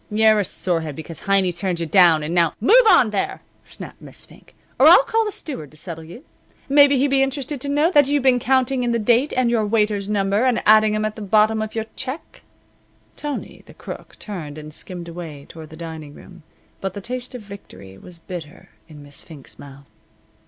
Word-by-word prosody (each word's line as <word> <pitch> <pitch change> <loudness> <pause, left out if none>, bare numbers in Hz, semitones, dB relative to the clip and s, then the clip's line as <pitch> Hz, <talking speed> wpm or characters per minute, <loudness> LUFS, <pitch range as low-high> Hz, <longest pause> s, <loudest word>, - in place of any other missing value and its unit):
"You're 215 0 +4
a - - +1
sorehead 165 -6 -2
because 160 +1 -9
Heiny 195 -2 +1
turned 180 -1 -2
you 165 - -2
down 165 -3 +5
and 155 +3 -3
now 170 -3 +2
" - - -44
"Move 455 - +5
on 255 - +5
there!" 200 - -2 0.2
snapped - - -12
Miss - - -9
Fink, - - -20 0.2
"or - - +7
I'll - - +8
call 450 -1 0
the 420 - -3
steward 260 - -8
to 155 - -18
settle 165 +1 -8
you. 175 - -13 0.4
Maybe 285 0 +5
he'd 280 +2 +2
be 270 0 +3
interested 270 0 -2
to 280 - -4
know 295 +4 +2
that 290 -5 +5
you've 285 -1 0
been 255 -2 +4
counting 260 +1 +1
in 240 -1 0
the - - +1
date 240 +5 +2
and 250 -2 +2
your 230 -2 +1
waiter's 210 -2 0
number, 200 +1 +1
and 255 -2 +1
adding 215 0 +5
'em 215 - -1
in 215 - 0
at 215 - -15
the - - -7
bottom 215 +2 +2
of 220 0 -5
your 220 -1 -2
check." 260 +5 -6 0.7
Tony, 295 -1 -6
the - - -15
Crook, - - -10
turned 160 -8 -7
and 150 0 -10
skimmed 175 +1 -8
away 165 -4 -9
toward 160 -2 -11
the 160 - -12
dining 160 -3 -8
room, 180 -2 -15 0.4
but 195 -1 -4
the 200 - -6
taste 250 +4 -6
of 240 - -8
victory 195 - -12
was 180 -1 -12
bitter 165 -1 -10 0.2
in 150 -3 -13
Miss 145 -1 -8
Fink's 150 -5 -12
mouth. 140 0 -13
210 Hz, 215 wpm, -21 LUFS, 165-255 Hz, 0.7 s, I'll